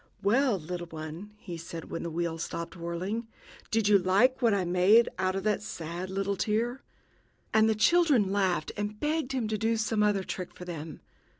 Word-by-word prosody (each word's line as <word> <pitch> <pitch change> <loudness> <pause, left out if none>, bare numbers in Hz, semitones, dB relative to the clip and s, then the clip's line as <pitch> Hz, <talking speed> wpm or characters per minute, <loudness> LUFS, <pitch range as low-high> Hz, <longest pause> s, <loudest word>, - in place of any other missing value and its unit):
"Well, 235 +2 +3
little 175 +1 -6
one," 160 +6 -8
he 180 -5 -7
said, 165 0 -8
when 165 - -3
the 170 - -3
wheel 165 0 -2
stopped 170 +2 -5
whirling, 185 +7 -3 0.4
"did 220 -2 +2
you 205 -1 +6
like 200 +9 +3
what 235 -2 +4
I 195 -3 +1
made 185 +6 +5
out 185 0 +1
of 195 - -2
that 210 -1 +1
sad 175 -1 -5
little 195 +1 -1
tear?" 230 +6 -1 0.7
And 220 0 +5
the 220 - +2
children 270 - +4
laughed, 190 -5 +1
and 205 +1 -4
begged 300 -2 -1
him 250 -4 -1
to 215 -1 -2
do 225 +1 +1
some 215 0 0
other 205 -2 +2
trick 180 -1 -6
for 180 - -9
them. 165 -3 -7
200 Hz, 190 wpm, -29 LUFS, 175-220 Hz, 0.7 s, you